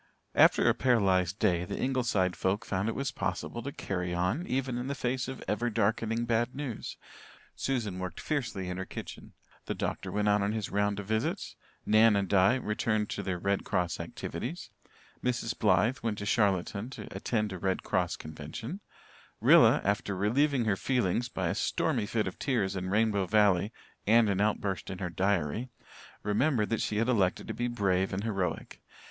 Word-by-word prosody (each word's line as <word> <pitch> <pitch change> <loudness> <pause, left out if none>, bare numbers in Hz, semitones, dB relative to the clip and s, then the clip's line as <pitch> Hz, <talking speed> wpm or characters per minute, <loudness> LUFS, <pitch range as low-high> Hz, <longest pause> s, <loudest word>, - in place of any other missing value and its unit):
After - - +5
a - - +6
paralysed 95 -7 +2
day 90 -6 +2
the - - -5
Ingleside 120 -9 +1
folk 95 +3 -1
found 95 +3 -1
it - - -3
was 135 0 -2
possible 120 -2 -3
to 140 - -5
"carry 90 -7 -3
on" 95 - 0
even 130 -1 -1
in 125 - -4
the 140 - -2
face 125 -1 -1
of 130 - -6
ever 120 +3 0
darkening 115 +1 0
bad 120 +1 0
news. 135 -6 -5 0.6
Susan 110 -9 -2
worked 90 -2 -5
fiercely 115 -11 -2
in 90 0 -4
her 95 - -3
kitchen, - - -9 0.3
the - - -2
doctor - - -3
went 105 0 0
out 105 0 +4
on 100 +1 0
his 110 -3 -3
round 100 0 +1
of 100 - -5
visits, 110 +2 -2 0.3
Nan 110 0 +5
and 100 -1 +1
Di 95 +5 +4
returned 105 -3 -1
to - - -3
their 95 -2 -2
Red 100 +2 0
Cross 90 -2 -1
activities; 165 +9 -5 0.5
Mrs. 125 -1 -1
Blythe 125 +4 +2
went 110 -3 -2
to 100 - -5
Charlottetown 100 +1 +1
to 135 - -8
attend 105 -4 -1
a 95 - -6
Red 95 +1 -1
Cross - - 0
Convention; 80 - -7 0.6
Rilla - - +6
after 100 0 0
relieving 125 +6 +2
her 105 -3 +2
feelings 120 +1 0
by - - -2
a - - 0
stormy 105 - 0
fit 110 -1 0
of 95 - -6
tears 110 -9 0
in 95 -1 -3
Rainbow 105 -2 +2
Valley 105 -1 +3 0.4
and 110 -1 +5
an 100 0 0
outburst 105 -2 -1
in 95 - -5
her 90 -2 -4
diary, 95 - 0 0.5
remembered 105 +2 +1
that 115 - +1
she 105 - -1
had 115 +2 +1
elected 100 -8 +1
to - - -2
be 120 - -1
brave 95 -5 +1
and 95 +2 -2
heroic. 95 -6 -3
105 Hz, 180 wpm, -30 LUFS, 95-120 Hz, 0.6 s, a